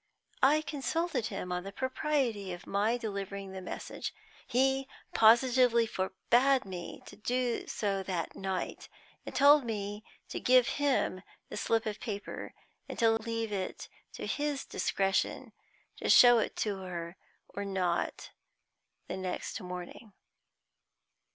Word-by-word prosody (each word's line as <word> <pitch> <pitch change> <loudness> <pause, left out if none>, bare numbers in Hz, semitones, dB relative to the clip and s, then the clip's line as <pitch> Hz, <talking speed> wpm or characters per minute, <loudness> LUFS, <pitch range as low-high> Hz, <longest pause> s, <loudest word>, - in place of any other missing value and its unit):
I 295 +4 +5
consulted 295 -2 -1
him 180 - -5
upon 180 0 -1
the 195 - -6
propriety 260 -5 -1
of 175 +2 -9
my 210 +4 +1
delivering 200 -3 -5
the 190 0 -6
message. 180 - -6 0.3
He 265 +2 +2 0.3
positively 235 +1 +5
forbade 240 +7 +2
me 180 -2 -7
to - - -11
do 245 +3 -1
so 200 -2 -1
that 180 -3 -3
night, 190 -1 -4 0.4
and - - -6
told 285 +1 +7
me 210 -2 -4 0.3
to - - -4
give 255 0 +5
him 270 -9 +1 0.3
the - - -6
slip 225 -1 +1
of 215 -1 -3
paper, 205 -3 -6 0.3
and - - -6
leave 225 -1 +1
it 190 -2 -4 0.2
to - - -6
his 290 -2 -2
discretion 195 -1 0 0.5
to - - -3
show 245 -1 +8
it - - -2
to 205 -3 -1
her 175 -2 -6 0.3
or 200 - -5
not 185 -3 -1 0.8
the - - -4
next 185 -1 -4
morning. 180 +4 -8
220 Hz, 130 wpm, -31 LUFS, 190-255 Hz, 0.8 s, show